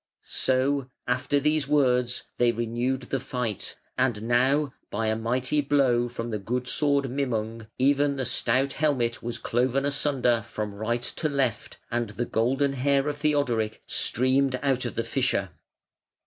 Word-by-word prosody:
So, 130 +1 +1 0.2
after 130 +3 +1
these 150 0 +1
words, 125 -4 +2 0.2
they 120 -1 +4
renewed 120 +3 -1
the 135 +2 -2
fight; 125 -5 -4 0.2
and 120 -5 +1
now, 130 +4 +2 0.2
by 110 +2 -2
a 110 - +1
mighty 125 +6 0
blow 135 -4 +2
from 120 0 -5
the 105 - -2
good 125 +5 -3
sword 140 0 +2
Mimung, 115 -5 -2
even 140 +2 +3
the 135 -2 -2
stout 130 +2 +1
helmet 130 -6 0
was 120 0 -4
cloven 130 +3 0
asunder 135 -5 +2
from 105 -1 -5
right 115 +4 -2
to 155 - -1
left, 135 -6 -1
and 120 -1 -1
the 120 +3 -3
golden 135 +6 +1
hair 140 +1 +1
of 145 -1 -2
Theodoric 135 -8 0
streamed 130 +1 +2
out 130 -3 +1
of 120 - -4
the 115 - 0
fissure. 125 -8 0
125 Hz, 150 wpm, -26 LUFS, 120-140 Hz, 0.2 s, they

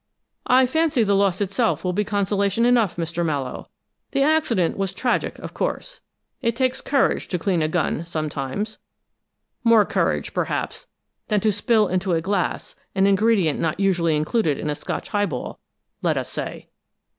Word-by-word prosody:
"I 255 +1 +5
fancy 310 -1 +2
the 200 -1 +2
loss 195 -1 +2
itself 205 +4 0
will 180 -1 0
be 210 +3 +1
consolation 200 +2 +1
enough, 240 -6 +3
Mr. 170 0 -2
Mallowe. 140 -6 -3 0.4
The 275 0 +3
accident 280 - +2
was 195 -2 -2
tragic, 245 -2 -1
of - - -8
course. - - -4 0.4
It 230 -3 0
takes 255 +1 0
courage 275 -1 +1
to 180 - -1
clean 175 0 0
a 155 - +2
gun, 165 0 -1
sometimes 155 +6 -3 0.8
more 230 -3 +6
courage, - - -1
perhaps, - - -3 0.4
than 210 -1 +2
to 215 - +3
spill 215 +1 +2
into 185 0 0
a 165 - +2
glass 190 +1 -2 0.2
an 195 0 +3
ingredient 200 -5 +3
not 160 +2 -1
usually 175 -5 +2
included 155 0 +1
in 150 - -2
a - - -2
Scotch - - -5
highball, 205 -1 -2 0.4
let - - +1
us - - -3
say." - - -6
200 Hz, 160 wpm, -23 LUFS, 170-230 Hz, 0.8 s, more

